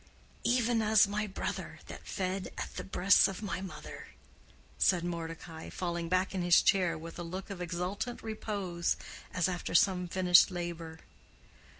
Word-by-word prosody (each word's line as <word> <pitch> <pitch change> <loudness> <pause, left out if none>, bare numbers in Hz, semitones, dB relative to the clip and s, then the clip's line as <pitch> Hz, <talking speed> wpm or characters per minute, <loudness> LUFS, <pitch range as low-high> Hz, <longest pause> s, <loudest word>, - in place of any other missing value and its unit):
"Even 240 -2 +2
as 215 -1 +5
my 210 +1 -2
brother 190 - -4
that - - -10
fed 190 0 -2
at - - -5
the - - -4
breasts 195 +1 +5
of 195 +2 -6
my 190 -3 -3
mother," 190 -2 -8 0.7
said 180 -3 +3
Mordecai, 165 -1 -6
falling 170 -2 -3
back 185 +1 +1
in 190 - -1
his 175 0 +5
chair 180 -4 +3
with 165 +2 -9
a - - -3
look 185 +4 -6
of 185 -2 -6
exultant 180 +7 -3
repose, 200 -6 -2 0.3
as 180 0 +1
after 180 -1 -3
some 180 0 +4
finished 180 0 +6
labor. 170 -3 -5
185 Hz, 155 wpm, -31 LUFS, 170-195 Hz, 0.7 s, finished